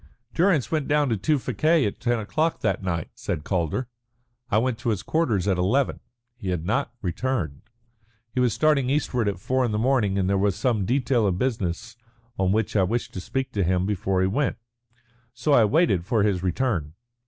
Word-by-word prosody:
"Durrance 165 Hz, -, +2 dB
went 155 Hz, -3 st, 0 dB
down 145 Hz, -1 st, +2 dB
to 115 Hz, -, +1 dB
Tewfikieh 155 Hz, -, +1 dB
at 100 Hz, -, -3 dB
ten 120 Hz, 0 st, +1 dB
o'clock 155 Hz, +10 st, -1 dB
that 95 Hz, -4 st, 0 dB
night," 85 Hz, -4 st, -3 dB
said 75 Hz, -, -4 dB
Calder. 90 Hz, -, -1 dB, 0.6 s
"I 105 Hz, -, +2 dB
went 120 Hz, 0 st, 0 dB
to 120 Hz, 0 st, -2 dB
his 105 Hz, -3 st, -1 dB
quarters 115 Hz, -, 0 dB
at 95 Hz, -3 st, +1 dB
eleven. 120 Hz, +10 st, +1 dB, 0.4 s
He 115 Hz, -6 st, -6 dB
had 85 Hz, -3 st, -2 dB
not 125 Hz, +6 st, 0 dB
returned. 90 Hz, -, -2 dB, 0.7 s
He 130 Hz, -, -1 dB
was 125 Hz, -2 st, +3 dB
starting 140 Hz, 0 st, +2 dB
eastward 130 Hz, -5 st, 0 dB
at 100 Hz, -3 st, -1 dB
four 130 Hz, +6 st, 0 dB
in 120 Hz, -, 0 dB
the 105 Hz, -, -1 dB
morning, 110 Hz, -5 st, +2 dB
and 95 Hz, -1 st, +1 dB
there 100 Hz, 0 st, +1 dB
was 100 Hz, -1 st, +1 dB
some 115 Hz, -7 st, 0 dB
detail 125 Hz, -3 st, +2 dB
of 90 Hz, -2 st, 0 dB
business 115 Hz, -1 st, -2 dB, 0.4 s
on 95 Hz, -1 st, +2 dB
which 110 Hz, 0 st, 0 dB
I 100 Hz, -, +4 dB
wished 115 Hz, +6 st, -1 dB
to 90 Hz, -, -5 dB
speak 130 Hz, +6 st, -3 dB
to 100 Hz, -, 0 dB
him 90 Hz, +1 st, +1 dB
before 95 Hz, -2 st, 0 dB
he 95 Hz, -, +3 dB
went. 135 Hz, +8 st, 0 dB, 0.8 s
So 140 Hz, +4 st, +1 dB
I 115 Hz, -, +6 dB
waited 105 Hz, -, +2 dB
for 105 Hz, +3 st, +1 dB
his 100 Hz, -4 st, +1 dB
return. 90 Hz, -, -1 dB
110 Hz, 195 wpm, -25 LUFS, 95-130 Hz, 0.8 s, I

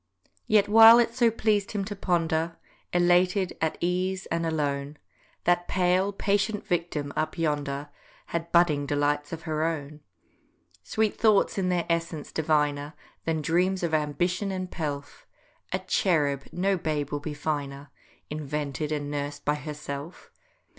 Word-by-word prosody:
Yet 210 Hz, -2 st, +4 dB
while 225 Hz, +2 st, +9 dB
it 235 Hz, -1 st, +2 dB
so 235 Hz, -1 st, +4 dB
pleas'd 215 Hz, -3 st, 0 dB
him 200 Hz, -2 st, -1 dB
to 205 Hz, +1 st, -5 dB
ponder, 165 Hz, -3 st, 0 dB, 0.3 s
Elated, 180 Hz, +2 st, +3 dB
at 160 Hz, -1 st, 0 dB
ease, 185 Hz, +2 st, -1 dB
and 165 Hz, 0 st, 0 dB
alone, 145 Hz, -2 st, -2 dB, 0.5 s
That 175 Hz, 0 st, +2 dB
pale, 185 Hz, +2 st, +2 dB
patient 200 Hz, +1 st, 0 dB
victim 160 Hz, -5 st, -2 dB
up 155 Hz, +3 st, -2 dB
yonder 145 Hz, -3 st, -2 dB, 0.4 s
Had 170 Hz, 0 st, -4 dB
budding 155 Hz, -5 st, +3 dB
delights 145 Hz, 0 st, 0 dB
of 160 Hz, -1 st, -6 dB
her 155 Hz, -1 st, -1 dB
own; 155 Hz, -2 st, -3 dB, 0.8 s
Sweet 220 Hz, -, -1 dB
thoughts 215 Hz, -2 st, +3 dB
in 185 Hz, -1 st, 0 dB
their 175 Hz, -2 st, 0 dB
essence 165 Hz, -2 st, -2 dB
diviner 150 Hz, -1 st, 0 dB, 0.3 s
Than 160 Hz, -2 st, -1 dB
dreams 180 Hz, +3 st, +1 dB
of 165 Hz, -2 st, -1 dB
ambition 175 Hz, +6 st, 0 dB
and 185 Hz, -1 st, -4 dB
pelf; 145 Hz, -3 st, -5 dB, 0.4 s
A -, -, +1 dB
cherub, 145 Hz, -6 st, +1 dB
no 190 Hz, +2 st, +1 dB
babe 150 Hz, -4 st, -2 dB
will 145 Hz, -, -1 dB
be 150 Hz, +1 st, -6 dB
finer, 145 Hz, -2 st, -4 dB, 0.4 s
Invented 150 Hz, -1 st, -3 dB
and 145 Hz, -1 st, -2 dB
nursed 145 Hz, 0 st, -4 dB
by 150 Hz, -, +3 dB
herself! 150 Hz, +1 st, -7 dB
165 Hz, 140 wpm, -27 LUFS, 145-185 Hz, 0.8 s, while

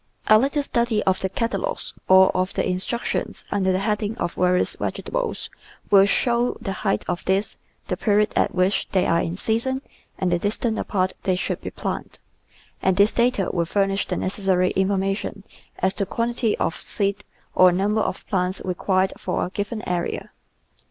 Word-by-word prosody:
A 215 Hz, 0 st, +7 dB
little 280 Hz, +4 st, +1 dB
study 235 Hz, -5 st, +1 dB
of 190 Hz, -1 st, +2 dB
the 190 Hz, -, -1 dB
catalogues 255 Hz, -, -2 dB
or 190 Hz, 0 st, +6 dB
of 185 Hz, +1 st, 0 dB
the -, -, +1 dB
instruc 185 Hz, +6 st, 0 dB
tions -, -, -3 dB
under 190 Hz, -2 st, +2 dB
the 185 Hz, -, +2 dB
heading 210 Hz, +1 st, -1 dB
of 175 Hz, -, -2 dB
various 180 Hz, 0 st, +2 dB
vegetables -, -, -3 dB, 0.4 s
will 195 Hz, -1 st, +7 dB
show 240 Hz, +3 st, +1 dB
the 225 Hz, -4 st, -4 dB
height 195 Hz, -2 st, 0 dB
of 175 Hz, -1 st, -2 dB
these, 195 Hz, +3 st, +1 dB, 0.3 s
the -, -, -1 dB
period 210 Hz, 0 st, +2 dB
at -, -, +1 dB
which 185 Hz, +2 st, +1 dB
they 185 Hz, -1 st, +3 dB
are 170 Hz, 0 st, +2 dB
in 165 Hz, -, -3 dB
season, 235 Hz, +7 st, -1 dB, 0.3 s
and 185 Hz, -2 st, 0 dB
the 175 Hz, -, +2 dB
distance 220 Hz, +3 st, -1 dB
apart 185 Hz, -2 st, 0 dB
they 185 Hz, -2 st, +1 dB
should 180 Hz, -, -2 dB
be -, -, -5 dB
planted, -, -, -5 dB, 0.6 s
and 185 Hz, -1 st, +2 dB
this 200 Hz, +2 st, +5 dB
data 235 Hz, -5 st, +1 dB
will 170 Hz, -2 st, +1 dB
furnish 195 Hz, +2 st, 0 dB
the -, -, -2 dB
necessary 185 Hz, -1 st, +1 dB
information 195 Hz, +1 st, -1 dB, 0.3 s
as 190 Hz, +1 st, +1 dB
to 200 Hz, -2 st, -2 dB
quantity 230 Hz, 0 st, 0 dB
of -, -, -1 dB
seed 200 Hz, -1 st, -1 dB, 0.3 s
or 185 Hz, -1 st, +6 dB
number 205 Hz, +4 st, +1 dB
of -, -, -3 dB
plants 185 Hz, -1 st, -1 dB
required 185 Hz, +1 st, +1 dB
for -, -, -1 dB
a -, -, -5 dB
given 205 Hz, +3 st, -4 dB
area. 175 Hz, -1 st, -2 dB
195 Hz, 175 wpm, -23 LUFS, 185-220 Hz, 0.6 s, A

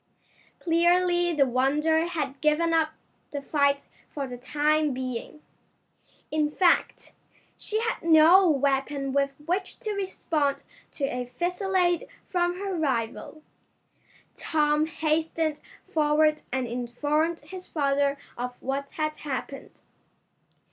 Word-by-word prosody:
Clearly 350 Hz, +1 st, +3 dB
the 295 Hz, -4 st, +3 dB
Wonder 300 Hz, +6 st, +2 dB
had 290 Hz, -5 st, -4 dB
given 310 Hz, +2 st, +2 dB
up 320 Hz, -1 st, +2 dB, 0.4 s
the 285 Hz, -, -4 dB
fight 280 Hz, 0 st, +1 dB, 0.2 s
for 285 Hz, -2 st, -4 dB
the 250 Hz, -2 st, -7 dB
time 300 Hz, +3 st, +1 dB
being. 255 Hz, +3 st, -5 dB, 0.9 s
In 305 Hz, -1 st, +1 dB
fact, 345 Hz, +3 st, +1 dB, 0.4 s
she 435 Hz, -, -2 dB
had 460 Hz, 0 st, -2 dB
no 335 Hz, +3 st, +6 dB
weapon 275 Hz, -1 st, 0 dB
with 280 Hz, 0 st, +2 dB, 0.2 s
which 370 Hz, +3 st, -2 dB
to 430 Hz, -3 st, -2 dB
respond 330 Hz, -7 st, -1 dB, 0.3 s
to 285 Hz, -, -6 dB
a 250 Hz, -2 st, -2 dB
fusillade 355 Hz, -, 0 dB, 0.2 s
from 350 Hz, -1 st, 0 dB
her 395 Hz, -1 st, -3 dB
rival. 275 Hz, 0 st, -2 dB, 0.9 s
Tom 300 Hz, -1 st, +1 dB
hastened 315 Hz, 0 st, -1 dB, 0.3 s
forward 305 Hz, 0 st, +2 dB
and 260 Hz, -1 st, -1 dB
informed 290 Hz, +8 st, -1 dB
his 365 Hz, +5 st, -9 dB
father 280 Hz, -1 st, +1 dB, 0.2 s
of 245 Hz, +1 st, -5 dB
what 275 Hz, +1 st, -3 dB
had 305 Hz, -1 st, -1 dB
happened. 275 Hz, -1 st, -6 dB
305 Hz, 115 wpm, -26 LUFS, 275-335 Hz, 0.9 s, no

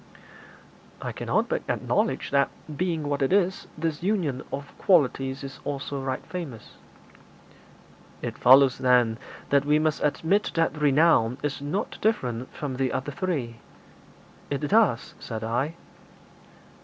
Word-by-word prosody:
'I -, -, -3 dB
cannot -, -, 0 dB
but -, -, -1 dB
acknowledge -, -, 0 dB
that, 140 Hz, 0 st, +3 dB, 0.3 s
being 165 Hz, -2 st, -1 dB
what 145 Hz, 0 st, -1 dB
it 135 Hz, -, +1 dB
is, 190 Hz, -1 st, +1 dB
this 160 Hz, -1 st, -2 dB
union 175 Hz, -9 st, 0 dB
of 140 Hz, +1 st, -6 dB
qualities 135 Hz, -6 st, +2 dB
is 135 Hz, 0 st, -8 dB
also 140 Hz, -1 st, -4 dB
right 130 Hz, -1 st, -3 dB
famous.' 150 Hz, -, -7 dB, 1.5 s
'It -, -, -3 dB
follows, 130 Hz, +1 st, +6 dB
then, 125 Hz, -3 st, +3 dB, 0.3 s
that 140 Hz, 0 st, +4 dB
we 150 Hz, +1 st, +3 dB
must 155 Hz, 0 st, 0 dB
admit 165 Hz, +7 st, +1 dB
that 165 Hz, -2 st, +1 dB
renown 145 Hz, -5 st, +3 dB
is 145 Hz, -1 st, -2 dB
not 150 Hz, +9 st, -3 dB
different 130 Hz, -, -1 dB
from 140 Hz, -6 st, -5 dB
the 130 Hz, -1 st, 0 dB
other 135 Hz, +2 st, -3 dB
three.' 140 Hz, -9 st, -3 dB, 0.9 s
'It 140 Hz, 0 st, -2 dB
does,' 205 Hz, -, +2 dB
said 110 Hz, -1 st, -6 dB
I. 125 Hz, +8 st, -1 dB
140 Hz, 130 wpm, -26 LUFS, 130-165 Hz, 1.5 s, follows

